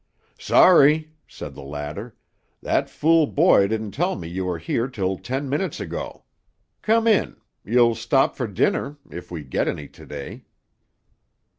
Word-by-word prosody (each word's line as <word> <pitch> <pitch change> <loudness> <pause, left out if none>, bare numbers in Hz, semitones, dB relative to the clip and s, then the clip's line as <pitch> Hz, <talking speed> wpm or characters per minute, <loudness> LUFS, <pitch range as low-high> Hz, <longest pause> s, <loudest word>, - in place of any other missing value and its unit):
"Sorry," 155 -2 +5 0.2
said - - -9
the - - -11
latter; 75 - -7 0.4
"that - - 0
fool 160 0 +3
boy 145 - +4
didn't 110 -1 -3
tell 175 - -1
me 85 - -7
you 90 +2 -4
were 90 -2 -2
here 115 +9 -2
till 95 -7 -2
ten 135 +8 -4
minutes 150 +8 -2
ago. - - -6 0.6
Come 225 +1 +2
in. 220 -4 +2 0.3
You'll 120 +2 +3
stop 115 +4 +1
for 125 - -3
dinner 140 +8 -1
if 90 - -9
we 85 -4 -6
get 65 - -2
any 75 - -4
to - - -15
day." 70 -2 -8
115 Hz, 150 wpm, -23 LUFS, 90-150 Hz, 0.6 s, Sorry